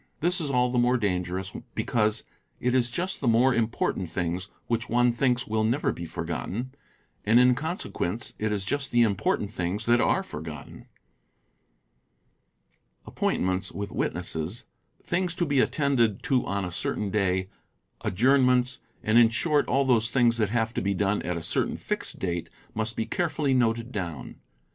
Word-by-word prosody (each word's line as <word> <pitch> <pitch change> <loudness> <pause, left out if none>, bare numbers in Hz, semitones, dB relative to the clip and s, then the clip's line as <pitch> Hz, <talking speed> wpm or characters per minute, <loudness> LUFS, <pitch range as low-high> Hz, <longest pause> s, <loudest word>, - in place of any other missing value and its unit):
This 175 +3 +1
is 150 - -2
all 125 -2 +2
the 125 - +1
more 125 +1 +3
dangerous 95 -3 -2 0.2
because 110 -1 +1 0.4
it 125 0 0
is 125 -2 +2
just 180 +9 -2
the 135 - -1
more 120 +3 +4
important 110 -6 -1
things 90 +2 -2 0.2
which 115 -1 -2
one 120 +1 +3
thinks 125 0 +1
will 110 0 0
never 120 +7 +1
be 85 - -6
forgotten, 90 +11 -4 0.5
and 110 +3 +5
in 125 0 +6
con 160 +7 -3
sequence 110 +8 -3
it 110 0 0
is 100 -2 -2
just 140 +6 -1
the 120 0 +4
important 100 -1 0
things 95 +2 -2
that 120 +1 +4
are - - +2
forgotten. 75 -1 -8 2.2
Appointments 95 0 -1
with 100 +3 -5
witnesses, 90 +2 -3 0.4
things 180 0 -1
to 175 - 0
be 140 -3 +1
attended 125 -7 +2
to 130 -3 +1
on 100 0 -1
a 90 - -5
certain 100 +4 -2
day, 95 -1 0 0.5
adjournments, 125 +3 +3
© - - -32 0.2
and 110 +2 +5
in 115 -1 +7
short 145 +5 +1
all 135 +2 +2
those 115 -3 +3
things 120 -1 +3
that 110 -3 +1
have 115 0 0
to - - -1
be 100 0 0
done 100 +2 +1
at 90 -1 -2
a 85 - -6
certain - - 0
fixed - - -3
date 85 -2 -3 0.2
must 110 +1 -1
be 110 - -1
carefully 155 -5 0
noted 115 -1 +1
down. 85 - -5
115 Hz, 165 wpm, -27 LUFS, 95-125 Hz, 2.2 s, in